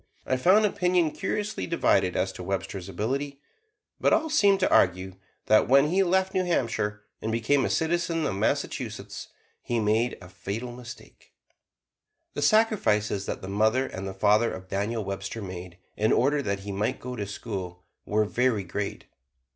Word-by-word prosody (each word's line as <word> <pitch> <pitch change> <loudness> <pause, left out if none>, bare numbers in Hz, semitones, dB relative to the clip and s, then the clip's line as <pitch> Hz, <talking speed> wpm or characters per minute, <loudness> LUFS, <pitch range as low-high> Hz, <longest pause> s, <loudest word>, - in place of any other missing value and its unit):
I 130 - +1
found 185 +11 +5
opinion 180 -5 +2
curiously 210 +5 -3
divided 95 - +2
as 95 - 0
to - - -9
Webster's 95 0 -4
ability; 135 +9 -3 0.6
but - - +3
all 320 -1 +2
seemed 200 -10 +4
to 185 - +2
argue 95 +1 +2 0.3
that 110 0 +4
when 140 +3 +5
he 190 +4 +3
left 190 +1 +2
New 185 -1 +1
Hampshire 110 -11 -1 0.2
and 110 - -2
became 115 +5 +2
a - - -1
citizen 165 0 0
of 110 - -1
Massachusetts, 100 +3 -3 0.3
he 120 -1 -1
made 110 +3 +1
a 90 - -12
fatal 110 +6 -5
mistake. 120 0 -12 1.0
The - - -3
sacrifices 125 - +2
that - - -4
the - - -5
mother 110 +6 +2
and 95 -5 -6
the 95 - -6
father 105 +4 +3
of 95 0 -8
Daniel 105 +2 -2
Webster 100 +3 -4
made, 90 -3 -7 0.2
in 110 +1 +1
order 145 +3 +3
that 100 -6 -2
he 100 +1 -6
might 100 +2 -1
go 125 0 -6
to 105 -4 -4
school, 95 -4 -6 0.2
were 105 +1 +1
very 115 -1 +1
great. 100 +3 -4
110 Hz, 165 wpm, -27 LUFS, 100-150 Hz, 1.0 s, found